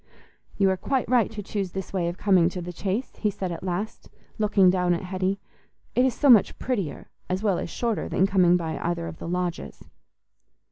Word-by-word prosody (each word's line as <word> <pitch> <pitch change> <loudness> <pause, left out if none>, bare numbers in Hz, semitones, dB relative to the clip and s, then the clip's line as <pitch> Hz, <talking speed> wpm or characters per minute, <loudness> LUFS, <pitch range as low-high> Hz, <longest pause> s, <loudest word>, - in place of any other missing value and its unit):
"You 195 - +4
are 190 - -1
quite 265 +5 -1
right 240 -2 +3
to 215 -2 -7
choose 195 -2 -3
this 190 0 -5
way 180 -3 0
of 175 +1 -4
coming 185 -5 +4
to 180 - -6
the 175 0 -6
Chase," 200 +8 -3
he 210 - +1
said 190 -3 -4
at 165 - -5
last, 190 +4 -4 0.3
looking 205 -3 +4
down 180 -1 +2
at 170 - -5
Hetty; 185 +1 -1 0.5
"it 250 - +3
is 255 -3 +1
so 290 - +1
much 235 -6 +6
prettier 200 - -3 0.2
as 185 +3 -1
well 200 -5 +2
as - - -4
shorter 230 +4 -2
than 190 - +2
coming 185 -3 +4
by 160 -2 -4
either 170 -1 -2
of 160 - -8
the - - -6
lodges." 180 0 -3
190 Hz, 205 wpm, -25 LUFS, 175-210 Hz, 0.5 s, much